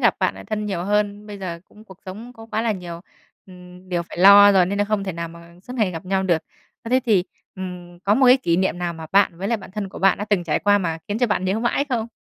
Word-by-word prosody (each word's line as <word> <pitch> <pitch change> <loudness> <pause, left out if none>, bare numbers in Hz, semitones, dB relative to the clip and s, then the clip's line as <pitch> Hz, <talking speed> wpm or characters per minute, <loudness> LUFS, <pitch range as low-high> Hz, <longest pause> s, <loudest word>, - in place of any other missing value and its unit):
gặp - - +3
bạn - - 0
lại - - -11
thân 210 -1 -3
nhiều 185 -4 -3
hơn. 205 0 -1
Bây 205 -1 -8
giờ 170 -3 -6
cũng 215 +1 -18
cuộc 190 -3 -15
sống 220 +6 -8
có 225 -1 -13
quá 220 - -1
là 230 - +1
nhiều, 175 -3 -7 0.5
ừm, 180 0 -15
điều 175 -2 -1
phải 170 - -11
lo 200 +2 +8
rồi 185 -2 +4
nên 200 +2 -2
là 205 - +2
không 205 -1 -1
thể 190 - -3
nào 170 0 -5
mà 170 0 -14
suốt 250 - -9
ngày 210 -5 +1
gặp 165 +1 -7
nhau 190 +1 0
được. 175 -4 +1 0.4
Ơ, - - -7
thế 255 - +4
thì, 195 -5 +3 0.3
ừm, 180 -2 -8
có 205 - +3
một 260 +2 +4
cái 250 - +8
kỷ 170 -11 0
niệm 185 -1 0
nào 175 -1 -2
mà 160 -1 -9
bạn 195 -4 +3
với 195 +3 -3
lại 230 - +1
bạn 195 -2 -12
thân 205 -1 -5
của - - -10
bạn 195 -1 +3
đã 205 - -3
từng 205 -4 0
trải 160 - 0
qua 205 0 +3
mà 165 -3 -2
khiến 210 +2 -2
cho 245 - +2
bạn 205 -3 -1
nhớ 190 +3 0
mãi 240 +4 0
không? 230 -4 -1
195 Hz, 295 wpm, -22 LUFS, 175-210 Hz, 0.5 s, lo